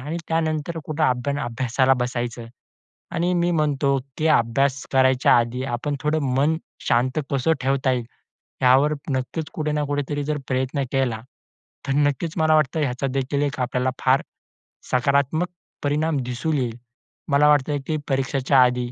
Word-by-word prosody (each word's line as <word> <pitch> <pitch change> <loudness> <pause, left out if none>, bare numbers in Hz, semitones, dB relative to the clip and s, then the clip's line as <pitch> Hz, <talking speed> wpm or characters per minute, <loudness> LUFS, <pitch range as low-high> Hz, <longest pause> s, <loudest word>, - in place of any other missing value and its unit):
आणि 150 +6 -4
त्यानंतर 160 0 -1
कुठे 155 0 -3 0.4
अभ्यासाला 130 +2 +1
बसायचं. 120 -1 -3 0.7
आणि 175 +2 0
मी 175 0 +1
म्हणतो, 145 -4 +1 0.2
की 155 - +1
अभ्यास 135 +1 +2
करायच्या 130 -2 +4
आधी 120 +2 -1
आपण 135 +4 -2
थोडं 155 +1 +1 0.2
मन 150 +4 +2 0.3
शांत 130 +5 +2
कसं 140 +4 +2
ठेवता 130 0 +1
येईल, 120 -2 -1 0.6
यावर 135 +4 +5 0.2
नक्कीच 130 +5 -3
कुठे 155 -1 -2
ना 150 -1 0
कुठेतरी 145 0 -2
जर 150 +1 -1
प्रयत्न 130 +2 -1
केला, 125 -5 0 0.7
तर 135 - +1
नक्कीच 145 +2 +1
मला 155 0 +4
वाटतं, 155 +1 +1
याचा 135 0 -1
देखील 135 +2 -1
एक 140 -2 -2
आपल्याला 125 +1 0
फार 130 +1 +3 0.7
सकारात्मक 140 +6 +2 0.4
परिणाम 150 +1 +1
दिसून 125 +5 -2
येईल. 120 -3 -2 0.5
मला 145 +1 +4
वाटतं, 145 0 +2
की 155 -1 0
परीक्षेच्या 135 0 +2
आधी 125 -1 0
140 Hz, 145 wpm, -23 LUFS, 130-150 Hz, 0.7 s, यावर